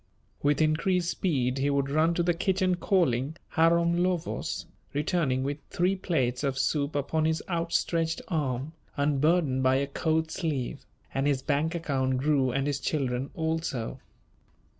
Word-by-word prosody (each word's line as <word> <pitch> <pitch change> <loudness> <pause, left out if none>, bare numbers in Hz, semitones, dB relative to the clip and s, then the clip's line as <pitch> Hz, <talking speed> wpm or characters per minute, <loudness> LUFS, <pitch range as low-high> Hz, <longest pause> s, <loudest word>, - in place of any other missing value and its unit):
With 145 +2 +3
increased 170 +3 +1
speed 135 -7 0
he 140 +1 +1
would 140 -1 +1
run 160 +3 +3
to 175 - +1
the 175 0 +2
kitchen 185 +1 +1
calling: 160 -6 +1 0.2
"Harom 170 +1 +3
Lövös," 180 -2 -1 0.3
returning 145 -4 0
with 145 +2 -2
three 180 +2 +1
plates 130 -9 -1
of 135 -2 0
soup 140 +1 0
upon 155 +2 0
his 160 0 0
outstretched 165 -1 0
arm, 145 -3 -2 0.2
unburdened 145 0 +2
by 130 0 +4
a 140 +1 +1
coat 160 +3 0
sleeve; 145 -6 -3 0.3
and 135 +1 +1
his 135 -2 +1
bank 155 +4 0
account 130 -5 0
grew 135 -1 +2
and 135 +2 0
his 145 -1 -1
children 135 -3 -1
also. 160 -7 -2
150 Hz, 145 wpm, -28 LUFS, 135-170 Hz, 0.3 s, by